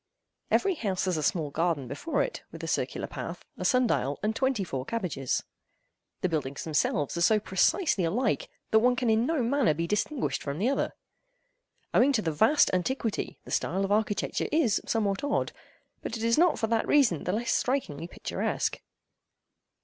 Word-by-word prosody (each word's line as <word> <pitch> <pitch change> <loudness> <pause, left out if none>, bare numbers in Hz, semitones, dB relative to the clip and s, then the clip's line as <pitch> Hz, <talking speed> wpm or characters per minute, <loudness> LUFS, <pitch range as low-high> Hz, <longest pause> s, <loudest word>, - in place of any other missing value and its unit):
Every 395 -1 +3
house 200 - -2
has 185 -2 0
a 155 - -1
small 150 0 0
garden 160 -4 0
before 310 - -1
it, - - -5
with - - -9
a - - -3
circular - - -1
path, - - -7
a - - -6
sun 255 0 +3
dial, 140 - 0
and 215 +1 0
twenty 260 -5 +1
four 135 -7 -4
cabbages. 160 - -2 0.8
The 185 - +1
buildings 140 -4 -2
themselves 150 -2 0
are - - -1
so 215 +5 +5
precisely 200 - +2
alike, 250 - 0 0.2
that 220 - +6
one 245 +2 +3
can 245 -2 +1
in 225 +3 +2
no 315 -6 +1
manner 240 - +2
be 165 +2 -1
distinguished 205 - -1
from 140 0 -4
the 215 +8 +1
other. 275 - 0 1.0
Owing 275 +3 +5
to 220 -5 +1
the 160 - 0
vast 220 - +4
antiquity, 225 +4 -1
the - - -10
style 190 +3 0
of 195 - -4
architecture 210 -1 0
is 280 -9 +2
somewhat 205 -2 0
odd, 285 0 0 0.5
but 230 - -4
it 225 - -5
is 230 0 +3
not 345 0 +4
for - - 0
that 225 0 0
reason 245 - +3
the - - 0
less 230 +5 -1
strikingly 170 - -1
picturesque. - - -2
215 Hz, 180 wpm, -28 LUFS, 165-255 Hz, 1.0 s, that